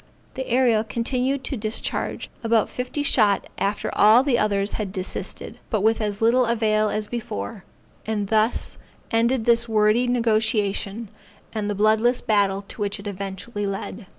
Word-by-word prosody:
The 260 -1 -5
Ariel 240 -3 +3
continued 255 +4 -1
to 275 - -3
discharge 215 -1 -3
about 225 -2 +2
fifty 250 +4 -3
shot 210 -8 +3
after 200 +1 -1
all 220 +5 +6
the 270 -4 +2
others 200 -1 +1
had 205 -3 -3
desisted, 185 -1 -4
but 215 -4 0
with 225 +2 +2
as 210 0 -2
little 240 +2 +4
avail 215 -2 +2
as 210 0 -2
before, 195 - -5 0.4
and 210 -3 -2
thus 220 +1 0 0.3
ended 230 +1 +2
this 235 0 +3
wordy 215 +3 +3
negociation, 220 -3 0 0.4
and 210 -2 -2
the 205 - -1
bloodless 220 +4 +3
battle 200 -2 +1
to - - -8
which 205 +1 -2
it 200 - -11
eventually 200 +2 -5
led. 195 +1 -5
215 Hz, 150 wpm, -23 LUFS, 205-235 Hz, 0.4 s, all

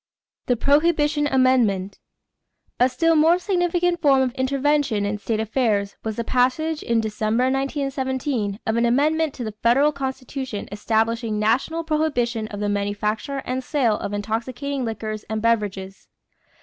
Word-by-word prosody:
=The 245 - +3
Prohibition 295 +2 +2
Amendment.= 240 -8 +2 0.8
A 250 +1 +5
still 330 +6 +2
more 320 +3 +5
significant 355 -2 0
form 275 -4 +4
of 255 - -1
intervention 275 -4 +1
in 205 +1 -2
state 220 +1 -2
affairs 220 -3 0
was 220 -1 -3
the 235 - -2
passage, 260 +7 +1
in 235 -1 +1
December, 220 +2 0
1917, 265 -5 -2
of 220 +1 0
an 235 0 +3
amendment 300 +4 +1
to 245 - -5
the 215 -2 -5
federal 270 +6 +4
Constitution 265 -4 -5
establishing 220 +1 0
national 250 +10 0
prohibition 245 -8 0
of 205 -1 -7
the 205 - -1
manufacture 210 +6 -2
and 255 +1 -2
sale 250 -7 +1
of - - -4
intoxicating 240 +7 -3
liquors 215 -1 -4
as 220 0 -3
beverages. 205 -4 -1
250 Hz, 140 wpm, -22 LUFS, 215-285 Hz, 0.8 s, A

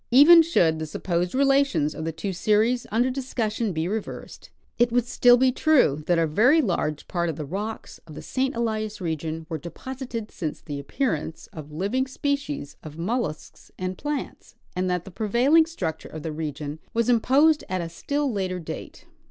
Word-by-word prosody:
Ea^cu 320 +7 +9
should 165 - +2
the 155 - -4
sup 150 - -8
posed 175 +1 0
relations 275 - +3
of 155 - -6
the 165 - -1
two 165 +5 -4
series 220 +6 +2
under 240 +4 +2
discussion 235 -5 -2
be 160 -1 -2
rcA^ersed, 210 +3 -5 0.3
it 240 0 +4
Avould 245 +1 +2
still 245 +1 +5
be 260 +1 +4
true 255 - +3
that 175 - +3
a 165 -1 +2
A^ery 240 - +4
large 155 - -2
part 170 -1 -1
of 160 - -3
the 150 -1 -5
rocks 205 +8 -5
of 155 - -11
the - - -8
St. 265 0 -1
Elias 215 -2 -2
region 160 -2 -3
Avere 160 -3 -5
deposited 245 - -6
since 155 -4 -4
the 145 -1 -6
appearance 160 - -2
of 155 -5 -8
liAdng 200 - -1
species 280 - -3
of 155 0 -10
mollusks 175 -3 -4
and 185 0 -3
plants, 295 +4 -5 0.2
and 185 0 0
that 180 -1 -1
the 195 - -10
prevailing 245 - +3
structure 180 - -4
of 155 -1 -8
the 160 - -3
region 150 -1 -5 0.2
Avas 230 -1 +2
imposed 275 +6 +4
at 185 -1 -1
a 170 - -4
still 285 - -2
later 185 -2 -2
date. 165 - -8
205 Hz, 185 wpm, -25 LUFS, 160-255 Hz, 0.3 s, Ea^cu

